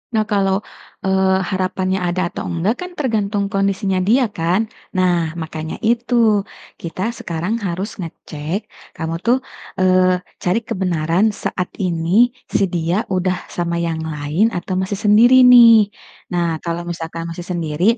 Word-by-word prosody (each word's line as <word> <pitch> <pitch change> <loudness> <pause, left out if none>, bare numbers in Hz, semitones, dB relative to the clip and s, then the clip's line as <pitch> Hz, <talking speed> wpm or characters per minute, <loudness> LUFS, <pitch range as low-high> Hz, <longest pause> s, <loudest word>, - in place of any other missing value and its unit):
Nah 215 - +3
kalau, 195 0 +1 0.4
eee, 190 0 +2
harapannya 185 0 -1
ada 175 +1 -1
atau - - -5
enggak 180 +7 0
kan 360 0 -6
tergantung 210 -7 -1
kondisinya 195 -1 0
dia 225 +8 +3
kan? 175 +2 0 0.3
Nah 175 -3 +1
makanya 160 0 -5
itu 235 +2 +1 0.7
kita 170 +2 -6 0.2
sekarang 175 +7 -3
harus 185 +5 -3
ngecek 160 0 -5 0.4
kamu 165 0 -3
tuh, 240 +2 +4 0.4
eee, 185 -1 +3 0.2
cari 180 +5 +2
kebenaran 180 +2 0
saat 180 -1 -2
ini 180 +7 +2 0.2
si - - +1
dia 175 +4 0
udah 185 0 +1 0.2
sama 170 -1 -2
yang 165 -1 -2 0.2
lain 150 +9 +1
atau 185 +1 -2
masih 190 +2 -2
sendiri 240 +5 +7
nih, 230 -4 +8 0.4
nah 170 -2 0
kalau 170 0 -2
misalkan 165 -1 -5
masih 170 +1 -6
sendiri 165 -2 -2
185 Hz, 135 wpm, -19 LUFS, 170-205 Hz, 0.7 s, nih